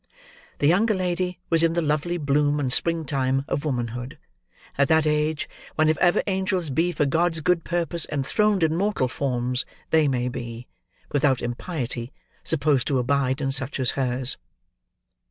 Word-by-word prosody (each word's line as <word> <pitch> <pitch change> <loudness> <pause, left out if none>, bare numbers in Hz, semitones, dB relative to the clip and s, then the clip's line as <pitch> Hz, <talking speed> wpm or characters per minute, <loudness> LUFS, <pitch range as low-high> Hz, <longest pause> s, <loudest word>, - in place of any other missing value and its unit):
The - - 0
younger 200 +8 +3
lady 180 -1 -1
was 165 -1 +4
in 165 0 +3
the 170 - +1
lovely 155 +3 0
bloom 145 -1 +1
and 130 -3 0
spring 165 +1 +1
time 135 -1 0
of 145 - -2
womanhood; 125 -2 -3 0.6
at 140 0 +3
that 160 -1 +3
age, 150 0 0 0.3
when, 155 0 +3
if 155 - +2
ever 175 -1 +3
angels 190 -5 -1
be 165 +6 +1
for 150 -3 0
God's 165 +4 +1
good 170 +1 +2
purposes 170 -1 0
enthroned 190 +7 +1
in 160 0 +2
mortal 195 -7 +1
forms, 125 -1 -1 0.3
they 160 -2 +4
may 125 -2 0
be, 120 -1 -6 0.4
without 140 -3 +2
impiety, 120 -2 -4 0.3
supposed 145 -5 +1
to 135 - +1
abide 130 +2 0
in 135 -1 0
such 135 +1 -1
as 130 -3 +3
hers. 130 -1 +1
150 Hz, 160 wpm, -24 LUFS, 130-170 Hz, 0.6 s, was